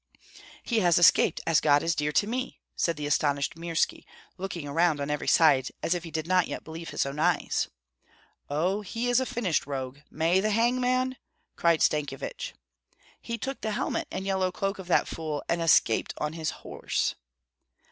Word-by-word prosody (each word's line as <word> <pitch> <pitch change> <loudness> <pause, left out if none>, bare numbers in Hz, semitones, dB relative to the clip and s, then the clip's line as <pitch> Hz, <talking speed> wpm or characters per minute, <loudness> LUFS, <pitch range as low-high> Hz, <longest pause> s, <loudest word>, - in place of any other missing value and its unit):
"He 230 -2 +1
has 175 -4 +4
escaped, 175 - +5
as 165 -2 +4
God 145 -1 +4
is 165 - +1
dear 150 -1 -1
to 200 - +2
me!" 250 +4 -4 0.2
said 170 -2 0
the 150 - -4
astonished 145 +1 +1
Mirski, 165 0 -1 0.3
looking 180 -5 -5
around 160 +1 +2
on 140 +1 -2
every 150 - -3
side, 135 -6 +5 0.2
as 165 - +2
if 175 -1 -3
he 170 - -7
did 160 -1 -3
not 185 0 +3
yet - - -5
believe 165 +1 -8
his - - -1
own 140 +2 -5
eyes. 175 +2 +1 0.8
"Oh, 180 +8 0
he 230 +4 -3
is 245 +1 +4
a 260 - -1
finished 185 - -1
rogue! 135 -1 -5
May 165 +4 +2
the 215 +3 +1
hangman 250 +3 +1 0.2
" - - -47
cried 170 -2 +3
Stankyevich. 145 -3 -2 0.7
"He 235 - -4
took 270 +4 -5
the 220 -1 -2
helmet - - -2
and 190 - -5
yellow 190 -1 0
cloak 195 +2 -2
of 190 - -8
that 180 - +3
fool, 155 -3 -4
and 170 0 0
escaped 155 -8 +3
on 150 +1 -2
his 160 -1 -2 0.2
horse." - - -1
170 Hz, 185 wpm, -27 LUFS, 150-195 Hz, 0.8 s, escaped